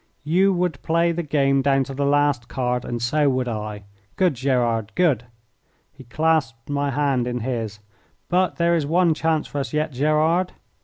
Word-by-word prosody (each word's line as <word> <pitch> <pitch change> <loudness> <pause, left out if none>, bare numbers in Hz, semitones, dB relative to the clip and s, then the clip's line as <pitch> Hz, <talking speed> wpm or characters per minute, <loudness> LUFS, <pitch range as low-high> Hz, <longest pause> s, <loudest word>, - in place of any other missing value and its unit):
"You 180 +6 +3
would 175 -5 -1
play 170 +1 +1
the 170 +1 -2
game 140 -3 +1
down 135 0 +2
to 135 - -7
the 140 +1 -1
last 145 -4 +2
card 125 -1 -2
and 120 - -3
so 145 +5 +2
would 130 -1 -1
I. 105 -2 -5 0.3
Good, 185 -4 +2
Gerard, 120 -4 0
good!" 145 - +2 0.7
He 130 - -15
clasped 145 -3 -1
my 140 0 0
hand 135 -3 0
in 125 -1 -3
his. 115 -4 -3 0.5
"But 180 +1 +1
there 170 0 +2
is 160 -4 0
one 170 +1 +3
chance 160 0 0
for 145 - -5
us 140 - -4
yet, 150 0 0
Gerard." 155 +6 +1
140 Hz, 175 wpm, -22 LUFS, 125-160 Hz, 0.7 s, You